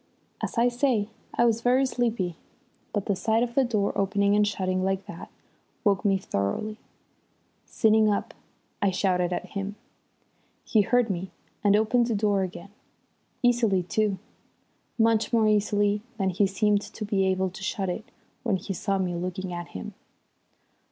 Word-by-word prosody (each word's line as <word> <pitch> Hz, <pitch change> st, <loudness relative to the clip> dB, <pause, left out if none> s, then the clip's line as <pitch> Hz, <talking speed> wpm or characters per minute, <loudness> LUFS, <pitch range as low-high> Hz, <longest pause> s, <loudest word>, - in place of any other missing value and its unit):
As -, -, -4 dB
I 235 Hz, +1 st, +5 dB
say, 240 Hz, -4 st, +1 dB, 0.3 s
I 235 Hz, -, +4 dB
was 230 Hz, -1 st, +2 dB
very 255 Hz, +3 st, +3 dB
sleepy, 230 Hz, -9 st, -1 dB, 0.6 s
but 205 Hz, -2 st, -2 dB
the 200 Hz, -, +1 dB
sight 220 Hz, +5 st, +1 dB
of 240 Hz, -1 st, -3 dB
the 270 Hz, -, +4 dB
door 215 Hz, -5 st, 0 dB
opening 200 Hz, +1 st, +2 dB
and 210 Hz, 0 st, +4 dB
shutting 185 Hz, -2 st, -1 dB
like 195 Hz, 0 st, -1 dB
that -, -, -9 dB, 0.5 s
woke 200 Hz, -3 st, +2 dB
me 195 Hz, -2 st, +3 dB
thoroughly. 190 Hz, -, -2 dB, 0.9 s
Sitting 220 Hz, -1 st, +3 dB
up 205 Hz, -, -1 dB, 0.5 s
I 200 Hz, -, +3 dB
shouted 180 Hz, -2 st, +1 dB
at 180 Hz, -, -3 dB
him. 200 Hz, 0 st, -4 dB, 0.9 s
He 220 Hz, -, +3 dB
heard 240 Hz, +1 st, +2 dB
me 185 Hz, +1 st, -4 dB, 0.3 s
and 205 Hz, -1 st, +5 dB
opened 230 Hz, +3 st, +3 dB
the 230 Hz, -, 0 dB
door 205 Hz, -1 st, +2 dB
again, 185 Hz, +1 st, -6 dB, 0.7 s
easily, 230 Hz, -6 st, +3 dB
too, 205 Hz, +2 st, 0 dB, 0.8 s
much 225 Hz, -1 st, +3 dB
more 225 Hz, -2 st, +3 dB
easily 205 Hz, -1 st, +2 dB, 0.2 s
than 190 Hz, -3 st, +1 dB
he 195 Hz, +3 st, +2 dB
seemed 205 Hz, +1 st, +2 dB
to 215 Hz, -, -7 dB
be 195 Hz, -2 st, +1 dB
able 190 Hz, 0 st, 0 dB
to 185 Hz, -, -10 dB
shut 190 Hz, 0 st, -2 dB
it 180 Hz, +4 st, -3 dB, 0.4 s
when 225 Hz, -5 st, +1 dB
he 190 Hz, +2 st, -5 dB
saw 195 Hz, +2 st, -1 dB
me 185 Hz, -2 st, -1 dB
looking 180 Hz, +1 st, -4 dB
at 175 Hz, 0 st, -5 dB
him. 90 Hz, -, -8 dB
205 Hz, 160 wpm, -26 LUFS, 190-220 Hz, 0.9 s, I